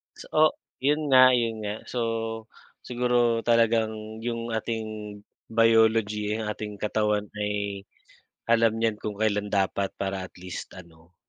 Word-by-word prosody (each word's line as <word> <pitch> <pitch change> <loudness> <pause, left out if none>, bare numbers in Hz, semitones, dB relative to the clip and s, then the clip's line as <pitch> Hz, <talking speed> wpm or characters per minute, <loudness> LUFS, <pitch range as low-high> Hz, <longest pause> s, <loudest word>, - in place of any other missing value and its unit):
So - - -11
o 155 - +4 0.4
iyon 145 +2 +1
nga 130 -1 +8
iyon 115 -2 0
nga, 105 0 -2 0.2
so 125 - -1 0.8
siguro 120 -1 +1
talagang 110 -2 +1
yung 115 -1 -3
ating 110 -2 -4 0.3
biology, 110 -2 +3
ang 110 -1 -4
ating 105 -1 -7
katawan 105 0 0
ay, 100 -1 -2 0.6
alam 115 -1 +4
niyan 115 -2 0
kung 105 -1 -4
kailan 105 -1 +1
dapat 100 0 0
para 95 -1 -3
at - - -32
least 90 0 -7
ano, 85 0 -16
110 Hz, 135 wpm, -26 LUFS, 105-115 Hz, 0.8 s, nga